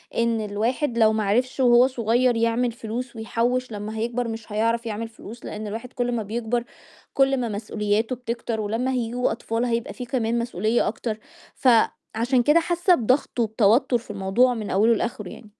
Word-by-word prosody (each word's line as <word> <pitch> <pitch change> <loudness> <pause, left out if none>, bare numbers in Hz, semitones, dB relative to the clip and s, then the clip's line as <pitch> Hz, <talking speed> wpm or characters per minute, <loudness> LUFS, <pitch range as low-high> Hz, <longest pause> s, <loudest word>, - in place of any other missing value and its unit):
إن 230 -1 +1
الواحد 230 +5 -1
لو 220 -1 +5
ما 215 -1 0
عرفش 250 +7 0
وهو 245 0 +6
صغيّر 245 0 +1
يعمل 230 +1 +1
فلوس 235 +2 -6
ويحوّش 240 +2 -1
لمّا 210 +1 -5
هيكبر 240 +2 -1
مش 225 -1 -7
هيعرف 230 +2 0
يعمل 225 0 -3
فلوس، 225 +1 -12
لإن 210 0 -5
الواحد 230 +4 -6
كل 245 0 -1
ما 230 -3 -1
بيكبر 235 +3 -2 0.5
كل 270 0 +3
ما 245 - -1
مسؤولياته 210 +2 -1
بتكتر، 235 -2 -4
ولمّا 225 +5 -1
هييجوا 245 0 -1
أطفال 230 +2 -2
هيبقى 235 -1 -2
في 250 - -7
كمان 235 -2 0
مسؤولية 230 0 0
أكتر، 220 0 -3 0.4
فعشان 240 0 +2
كده 300 +5 +5
حاسّة 350 +2 +2
بضغط 250 +1 0
وبتوتر 225 +3 +3
في 230 -2 -10
الموضوع 205 +6 +2
من 215 -4 -5
أوله 220 +5 +4
لآخِره 210 -4 -3
يعني. 215 - -12
230 Hz, 170 wpm, -24 LUFS, 220-245 Hz, 0.5 s, وهو